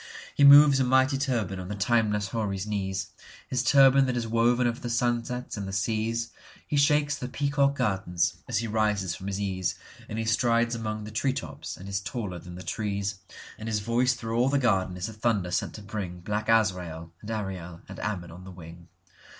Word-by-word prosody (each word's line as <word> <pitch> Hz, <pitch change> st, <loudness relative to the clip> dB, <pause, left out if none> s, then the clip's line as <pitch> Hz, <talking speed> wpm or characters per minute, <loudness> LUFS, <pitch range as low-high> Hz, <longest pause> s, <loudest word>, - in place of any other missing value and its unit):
He 145 Hz, -, +2 dB
moves 140 Hz, 0 st, +9 dB
a -, -, +3 dB
mighty 130 Hz, +2 st, +3 dB
turban 115 Hz, -9 st, -1 dB
on 90 Hz, -, -6 dB
the 105 Hz, -, -4 dB
timeless 105 Hz, -1 st, +1 dB
houri's 100 Hz, -4 st, -2 dB
knees, 95 Hz, -2 st, -3 dB, 0.4 s
His 125 Hz, -2 st, 0 dB
turban 135 Hz, +2 st, +6 dB
that 125 Hz, -1 st, -1 dB
is 120 Hz, -, -1 dB
woven 120 Hz, +2 st, +2 dB
of 120 Hz, -1 st, -1 dB
the 120 Hz, -, -4 dB
sunsets 120 Hz, +1 st, -1 dB
and 100 Hz, -1 st, -4 dB
the -, -, -5 dB
seas. 115 Hz, +3 st, -1 dB, 0.4 s
He -, -, -2 dB
shakes 145 Hz, +1 st, +3 dB
the 125 Hz, -, -5 dB
peacock 140 Hz, +1 st, +1 dB
gardens 95 Hz, -8 st, 0 dB
as 120 Hz, -, 0 dB
he 115 Hz, +2 st, -1 dB
rises 105 Hz, -4 st, 0 dB
from 95 Hz, -, -7 dB
his 100 Hz, 0 st, -3 dB
ease, 95 Hz, -3 st, -1 dB, 0.3 s
And 110 Hz, -, -4 dB
he 115 Hz, -, -1 dB
strides 115 Hz, +1 st, +2 dB
among 110 Hz, -2 st, -3 dB
the 105 Hz, -, -8 dB
tree 130 Hz, +5 st, 0 dB
tops 80 Hz, -, -6 dB
and 95 Hz, -, -10 dB
is 100 Hz, 0 st, -2 dB
taller 100 Hz, -4 st, -5 dB
than 90 Hz, +1 st, -10 dB
the 90 Hz, -, -8 dB
trees; 100 Hz, +1 st, -3 dB, 0.4 s
And 110 Hz, +1 st, -5 dB
his 105 Hz, -2 st, 0 dB
voice 120 Hz, +4 st, +2 dB
through 115 Hz, -1 st, -3 dB
all 125 Hz, +2 st, +3 dB
the 140 Hz, -, +2 dB
garden 95 Hz, -8 st, +1 dB
is 90 Hz, +3 st, -3 dB
a 110 Hz, -, -7 dB
thunder 105 Hz, -5 st, 0 dB
sent 90 Hz, -, -1 dB
to 105 Hz, -, -9 dB
bringBlack 105 Hz, +1 st, -4 dB
Azrael 90 Hz, -7 st, +1 dB
and 105 Hz, -, -9 dB
Ariel 95 Hz, -6 st, -5 dB
and -, -, -9 dB
Ammon 95 Hz, -5 st, -4 dB
on 90 Hz, +2 st, -11 dB
the 95 Hz, -, -10 dB
wing. 85 Hz, -1 st, -12 dB
110 Hz, 205 wpm, -27 LUFS, 95-120 Hz, 0.4 s, moves